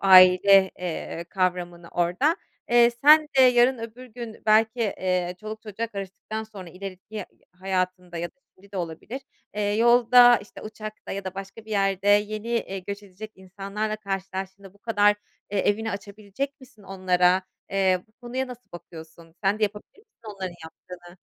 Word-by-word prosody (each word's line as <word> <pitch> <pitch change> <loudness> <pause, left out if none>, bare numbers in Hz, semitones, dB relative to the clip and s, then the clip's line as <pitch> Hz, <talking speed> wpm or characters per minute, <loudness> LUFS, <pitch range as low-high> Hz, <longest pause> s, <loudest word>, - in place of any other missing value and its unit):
aile, 190 0 +7
eee, 170 -1 -4
kavramını 175 -2 -2
orada. 180 - +1 0.3
Eee, 240 0 +6
sen 300 +6 +6
de - - +9
yarın 250 0 +5
öbür 230 +3 -8
gün 235 -2 -9
belki, 220 +2 +4
eee, 185 -4 -1
çoluk 215 +1 -7
çocuğa 220 +1 -4
karıştıktan 205 +1 -6
sonra 200 -5 -10
ileriki 195 +3 -8 0.3
hayatında 185 -1 -3
ya 175 +1 -3
da - - -63 0.2
şimdi 200 +2 -21
de - - -6
olabilir, 175 +9 -5 0.3
eee, 210 - -1
yolda, 240 +1 +7
işte, 205 - -13
uçakta 215 0 -8
ya 195 0 -5
da 190 - -5
başka 195 +3 -8
bir 220 - -13
yerde 195 -1 +1
yeni, 210 +2 +2
iii, 195 -5 -2
göç 200 +1 -5
edecek 205 +3 -10
insanlarla 200 +3 -4
karşılaştığında 195 -1 -6
bu - - -23
kadar, 205 -2 +3 0.4
eee, 205 - -1
evini 220 +3 +1
açabilecek 210 +7 -6
misin 255 -5 -17
onlara, 185 -1 +2 0.3
eee, 190 -2 +2
bu 215 - -34
konuya 250 +3 -4
nasıl 250 -5 -12
bakıyorsun 165 -1 -12
sen 200 +2 +2
de - - -5
yapabilir 210 - -3
misin 435 - -26
onların 190 -2 -5
yaptığını? 175 +2 -12
200 Hz, 160 wpm, -25 LUFS, 185-220 Hz, 0.4 s, de